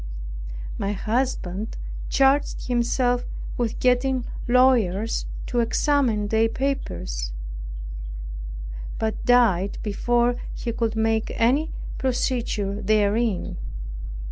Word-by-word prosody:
My 200 +1 0
husband 215 -2 -1 0.3
charged 275 +1 +3
himself 245 0 +2 0.3
with 235 -2 -1
getting 250 0 +2 0.2
lawyers 235 -5 +3 0.2
to 245 - 0
examine 235 -3 +2
their 225 +1 +3
papers, 85 - -2 1.7
but 220 -1 -1
died 220 -6 +4
before 240 +3 +2 0.2
he 235 - -2
could 225 -1 0
make 220 0 +1
any 275 +8 +3 0.3
procedure 235 -6 0
therein. 210 0 +2
235 Hz, 85 wpm, -25 LUFS, 210-250 Hz, 1.7 s, died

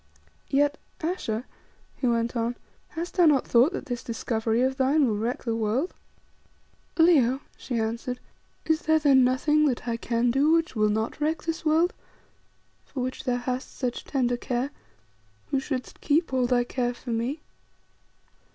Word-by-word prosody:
"Yet, 290 +1 +2 0.2
Ayesha," 255 -9 -2 0.5
he 255 - -1
went 235 0 0
on, 235 +1 -1 0.3
"hast 340 +3 -6
thou 310 -6 +6
thought 245 +7 +4
that - - -4
this 245 -4 -4
discovery 225 0 -1
of 265 +1 +1
thine 275 +2 +3
will 215 - 0
wreck 235 +6 -2
the 230 -2 -1
world?" 225 - 0 1.0
"Leo," 280 -6 +4
she 245 -3 -4
answered, 235 +3 -2 0.5
"is 320 0 +2
there 315 0 +3
then 280 -4 +5
nothing 295 +4 +3
that 250 -2 -2
I 230 -1 0
can 235 +1 +1
do 285 +5 +3
which 330 -4 +1
will 215 -1 +3
not 220 +7 -2
wreck 315 +2 0
this 330 0 -3
world, 325 +3 +3 0.9
for 265 - -6
which 255 +1 -4
thou 250 -2 +1
hast 250 +1 -4
such 250 -3 -2
tender 245 -3 0
care, 250 +3 -2 0.8
who 275 - +2
shouldst 265 -2 -5
keep 310 0 +1
all 255 -1 +2
thy 245 -1 +3
care 245 0 -2
for 240 - -7
me?" 240 +7 -2
255 Hz, 160 wpm, -26 LUFS, 235-295 Hz, 1.0 s, thou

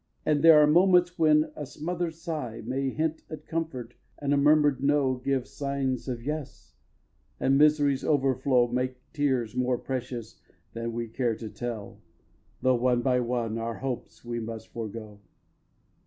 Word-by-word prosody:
And 150 -2 +2
there 165 -2 +9
are 150 - +7
moments 180 +2 +4
when 155 -1 +4
a 150 - -5
smother'd 165 +3 -4
sigh 155 -9 -5
May 135 +3 -1
hint 160 +3 -2
at 155 - -8
comfort 140 -8 -4 0.2
and 145 -1 -1
a - - +4
murmur'd 145 -1 +4
"No" 140 -2 +3
Give 130 0 -1
signs 140 -3 -3
of 120 -3 -4
"Yes," 150 +1 -6 0.7
and 135 - +3
Misery's 145 -2 +4
overflow 130 -3 +2
Make 125 +1 -2 0.2
tears 130 -7 0
more 125 0 +1
precious 125 -3 -5 0.3
than 115 0 -4
we 115 0 -3
care 115 0 -1
to 110 0 -7
tell, 115 -4 -6 0.6
Though, 130 -1 +4
one 120 0 +1
by 125 -2 +2
one, 120 -2 -2
our 115 0 -3
hopes 130 -2 -6
we 120 0 -3
must 110 0 -7
forego. 110 -2 -7
130 Hz, 155 wpm, -27 LUFS, 120-150 Hz, 0.7 s, there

